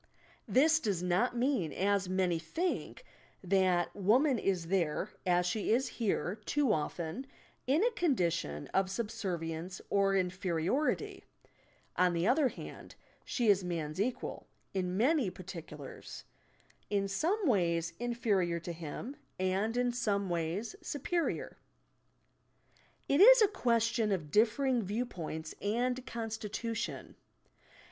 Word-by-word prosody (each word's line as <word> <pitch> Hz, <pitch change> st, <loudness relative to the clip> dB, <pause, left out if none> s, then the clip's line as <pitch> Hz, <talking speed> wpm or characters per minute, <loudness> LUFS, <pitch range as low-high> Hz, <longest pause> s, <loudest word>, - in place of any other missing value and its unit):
This 315 Hz, +4 st, +4 dB
does 200 Hz, -, -1 dB
not 185 Hz, +8 st, +1 dB
mean, 240 Hz, -, +1 dB
as 200 Hz, -1 st, +1 dB
many 185 Hz, -3 st, +1 dB
think, 350 Hz, -, -3 dB, 0.4 s
that 185 Hz, -2 st, +2 dB
woman 240 Hz, +7 st, +3 dB
is 180 Hz, -5 st, -1 dB
there 185 Hz, +1 st, 0 dB, 0.2 s
(as 180 Hz, 0 st, +3 dB
she 205 Hz, +4 st, 0 dB
is 250 Hz, +4 st, +2 dB
here, 205 Hz, -3 st, -1 dB
too 280 Hz, -1 st, +2 dB
often) 165 Hz, -, -3 dB, 0.4 s
in 295 Hz, +9 st, +3 dB
a 485 Hz, -, +3 dB
condition 170 Hz, -, 0 dB
of 190 Hz, -1 st, +1 dB
subservience 185 Hz, -5 st, -4 dB
or 195 Hz, -1 st, +3 dB
inferiority. 185 Hz, -, 0 dB, 0.7 s
On 180 Hz, -1 st, +4 dB
the 170 Hz, +1 st, 0 dB
other 270 Hz, +5 st, +4 dB
hand, -, -, -9 dB, 0.3 s
she 240 Hz, -3 st, 0 dB
is 200 Hz, -2 st, +5 dB
man's 170 Hz, -1 st, -3 dB
equal 245 Hz, +3 st, -3 dB, 0.3 s
in 185 Hz, -1 st, -1 dB
many 265 Hz, -, +3 dB
particulars; 165 Hz, -6 st, -9 dB, 0.7 s
in 200 Hz, -1 st, +1 dB
some 360 Hz, -, 0 dB
ways 170 Hz, -, +1 dB
in 240 Hz, 0 st, -2 dB
ferior 190 Hz, -8 st, +1 dB
to 175 Hz, -, -4 dB
him, 170 Hz, -, -6 dB, 0.2 s
and 195 Hz, +5 st, 0 dB
in 245 Hz, 0 st, +2 dB
some 205 Hz, -5 st, 0 dB
ways 170 Hz, +7 st, -2 dB
superior. 335 Hz, +4 st, -2 dB, 1.5 s
It 280 Hz, +5 st, +3 dB
is -, -, +9 dB
a -, -, +6 dB
ques 235 Hz, -, +1 dB
tion 230 Hz, -2 st, +1 dB
of 160 Hz, -7 st, -2 dB
differing 240 Hz, -, +3 dB
viewpoint 185 Hz, -7 st, -4 dB
and 245 Hz, +5 st, 0 dB
constitution. 225 Hz, 0 st, -4 dB
200 Hz, 125 wpm, -32 LUFS, 180-245 Hz, 1.5 s, is